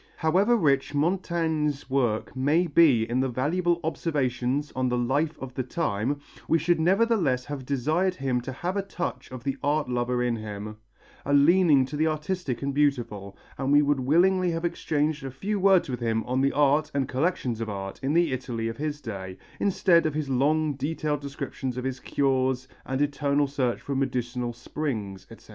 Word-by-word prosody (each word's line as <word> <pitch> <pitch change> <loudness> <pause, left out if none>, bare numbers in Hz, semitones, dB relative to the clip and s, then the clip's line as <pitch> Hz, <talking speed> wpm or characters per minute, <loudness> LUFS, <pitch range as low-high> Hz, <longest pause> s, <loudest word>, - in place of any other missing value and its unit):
However 190 +9 +3
rich 140 -6 +1
Montaigne's 160 -3 0
work 125 -4 0
may 145 +7 +2
be 145 -8 +4
in 125 +2 0
valuable 170 +7 0
observations 145 -3 -1
on 130 -1 0
the 125 - 0
life 140 +6 0
of 130 -1 -7
the 130 - -2
time, 130 -1 -1 0.3
we 165 - +4
should 165 +1 +1
nevertheless 175 - +2
have 140 -3 -6
desired 155 +8 +1
him 130 -5 -1
to 130 +2 -6
have 175 +8 -3
a 200 - +1
touch 175 -10 -5
of 130 -2 -8
the 135 +1 -2
art 150 0 +1
lover 125 0 0
in 120 -1 0
him, 105 0 -7 0.5
a 140 - +1
leaning 150 -2 +5
to 140 - -7
the 155 +2 +2
artistic 155 -4 -2
and 140 0 -1
beautiful, 115 -9 -1 0.2
and 135 0 0
we 145 +1 +6
would 145 -1 +1
willingly 180 +7 +3
have 165 0 -2
exchanged 150 -3 -1
a 135 - -4
few 195 +11 -3
words 190 -1 +4
with 125 -3 -4
him 115 -2 0
on 130 +1 -1
the 140 0 +3
art 145 +1 +3
and 135 -2 +1
collections 130 -5 -1
of 110 - -3
art 95 -1 -5
in 140 +2 0
the 170 -4 +3
Italy 120 -3 -3
of 115 0 -5
his 150 0 -3
day, 95 -6 -6 0.2
instead 185 -4 +3
of 155 - -3
his 150 -3 -2
long, 150 +4 +2
detailed 150 +1 -2
descriptions 135 -2 -5
of 125 - -3
his 130 -1 -3
cures 130 -2 0 0.2
and 130 0 -2
his 145 - +4
eternal 145 0 +1
search 135 -3 -1
for 140 - -5
medicinal 125 -2 -2
springs, 115 -6 -5
etc. - - -15
140 Hz, 185 wpm, -26 LUFS, 125-160 Hz, 0.5 s, we